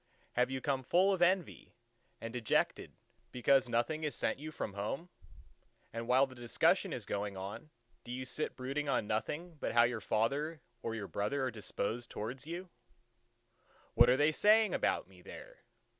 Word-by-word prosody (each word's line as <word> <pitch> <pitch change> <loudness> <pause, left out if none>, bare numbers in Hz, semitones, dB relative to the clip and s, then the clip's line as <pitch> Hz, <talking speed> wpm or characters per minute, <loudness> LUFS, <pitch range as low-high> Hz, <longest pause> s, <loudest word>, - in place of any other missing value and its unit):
Have 125 +1 +2
you 130 0 -3
come 135 -1 0
full 185 +9 +3
of 185 - -2
envy, 180 -1 +1 0.4
and 115 0 -6
dejected 120 -3 0 0.4
because 130 +1 +3
nothing 155 +7 0
is 150 - -1
sent - - -1
you 155 +2 -6
from 105 - -4
home; 110 - -4 0.8
and 115 0 -4
while 130 +2 +5
the 130 - -12
discussion 120 -2 +2
is - - -4
going 100 -1 -3
on, 100 +11 -7 0.3
do 120 - -8
you 130 +1 -4
sit 150 +4 -3
brooding 140 +3 -3
on 125 - +1
nothing 150 +11 -3
but - - -2
how 120 0 +7
your 120 -2 0
father 140 +11 0 0.2
or 115 - -3
your 105 -3 -4
brother 105 +9 -1
are 130 - 0
disposed 115 +2 -3
towards 125 +7 -5
you:—"What 120 -11 -3
are 125 - +5
they 150 +2 +4
saying 215 +6 +5
about - - +1
me - - -17
there? - - -11
130 Hz, 170 wpm, -34 LUFS, 115-150 Hz, 0.8 s, how